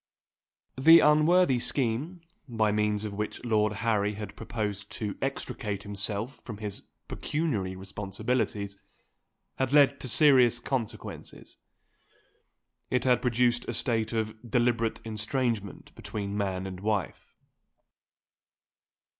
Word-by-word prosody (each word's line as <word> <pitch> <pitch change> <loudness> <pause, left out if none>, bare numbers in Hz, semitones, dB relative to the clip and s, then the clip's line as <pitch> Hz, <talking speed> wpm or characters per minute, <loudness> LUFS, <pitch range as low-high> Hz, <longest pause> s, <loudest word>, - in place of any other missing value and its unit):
THE 165 +5 +9
unworthy 155 -1 +4
scheme, 135 +9 -2 0.3
by 110 -3 +1
means 105 0 0
of 105 - -4
which 105 +4 -4
Lord 105 -2 +2
Harry 105 -2 +1
had 105 0 -7
proposed 105 -3 -4
to 105 -3 -3
extricate 105 -6 -3
himself 105 +4 -3
from 115 -4 -9
his 105 -2 -6 0.3
pecuniary 125 - -2
responsibilities, 100 +2 -3 0.8
had 130 0 -1
led 140 -1 +5
to - - -5
serious 125 -3 +5
consequences. 120 -3 -5 1.3
It 125 -1 +1
had 125 -2 +3
produced 120 0 +2
a 120 - -2
state 115 -3 0
of 110 -1 -1 0.2
deliberate 120 -1 +1
estrangement 110 -1 -2
between 100 -1 -5
man 95 -2 -2
and 95 -1 -6
wife. 105 -3 -3
110 Hz, 110 wpm, -28 LUFS, 105-125 Hz, 1.3 s, THE